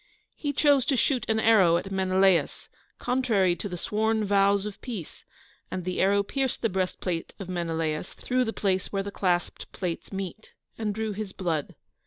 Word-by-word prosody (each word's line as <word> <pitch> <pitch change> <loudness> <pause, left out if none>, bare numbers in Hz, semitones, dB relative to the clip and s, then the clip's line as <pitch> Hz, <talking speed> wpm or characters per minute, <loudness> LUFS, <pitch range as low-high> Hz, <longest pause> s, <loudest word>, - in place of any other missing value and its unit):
He 290 - -2
chose 285 -1 +4
to 275 -4 +2
shoot 250 -1 +1
an 220 0 +2
arrow 195 -7 +5
at 195 +3 -5
Menelaus, 190 -1 +2 0.3
contrary 230 -8 +2
to 205 - -5
the 180 - -5
sworn 220 +3 0
vows 200 0 +3
of 210 -2 -7
peace, 215 - -7 0.4
and 180 -2 -4
the 185 0 -1
arrow 200 +1 +3
pierced 265 +4 -2
the 225 - +3
breastplate 185 -2 -2
of 195 - -7
Menelaus 165 -2 -2
through 255 0 0
the 225 - -1
place 190 -4 -1
where 195 -1 -1
the 200 - -5
clasped 180 -3 -1
plates 180 -3 -4
meet, 195 +2 -6 0.2
and 210 -2 -2
drew 220 0 -2
his 205 -1 -5
blood. 165 -6 -2
195 Hz, 175 wpm, -27 LUFS, 185-220 Hz, 0.4 s, arrow